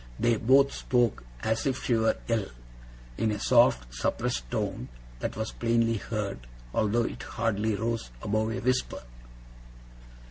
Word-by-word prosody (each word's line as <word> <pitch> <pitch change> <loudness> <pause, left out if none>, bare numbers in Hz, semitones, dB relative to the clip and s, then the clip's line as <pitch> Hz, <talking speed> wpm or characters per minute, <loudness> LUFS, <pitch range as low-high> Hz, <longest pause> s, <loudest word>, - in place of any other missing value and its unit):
They 120 -1 +3
both 135 +5 +4
spoke 120 - +1 0.2
as 110 +4 0
if 130 -1 -1
she 125 - +1
were 110 -1 +2
ill; 115 -4 0 0.7
in 110 - +2
a 105 -1 -2
soft, 105 - +4
suppressed - - -1
tone - - -3 0.3
that - - -3
was 110 +1 -3
plainly 115 -1 +1
heard, 100 - -4 0.3
although 110 +2 +2
it - - -5
hardly 110 0 -1
rose 115 - -2
above 110 +1 0
a 120 - -2
whisper. 125 +1 0
110 Hz, 140 wpm, -28 LUFS, 105-120 Hz, 0.7 s, both